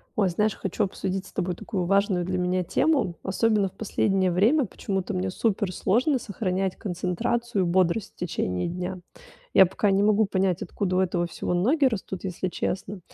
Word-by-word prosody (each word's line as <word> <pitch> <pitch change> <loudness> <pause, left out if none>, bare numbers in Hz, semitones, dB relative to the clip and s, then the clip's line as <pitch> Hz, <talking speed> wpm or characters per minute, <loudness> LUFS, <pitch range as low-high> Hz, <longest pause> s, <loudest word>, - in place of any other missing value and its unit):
Ой, 200 -3 +3
знаешь, 210 +4 +1
хочу 195 +3 -2
обсудить 190 -1 -3
с - - -14
тобой 180 -2 -1
такую 185 -3 -3
важную 195 -1 +2
для 185 +1 -1
меня 180 0 0
тему. 275 - +1
Особенно 205 0 +1
в - - -27
последнее 195 -2 +1
время 230 - +3
почему-то 190 -2 -3
мне 185 +1 -1
супер 200 0 0
сложно 250 - +2
сохранять 195 -3 -2
концентрацию 205 +4 -1
и - - 0
бодрость 185 +3 +1
в - - -44
течение 90 - -2
дня. 180 +2 -4 0.6
Я 190 - +9
пока 190 +3 0
не 195 +1 +3
могу 215 +1 +4
понять, 190 -2 0
откуда 185 -3 -2
у - - +4
этого 175 -2 +1
всего 175 +1 -3
ноги 265 - +3
растут, 195 -6 -2
если 185 -1 -3
честно. 190 +2 -3
190 Hz, 180 wpm, -26 LUFS, 180-210 Hz, 0.6 s, Я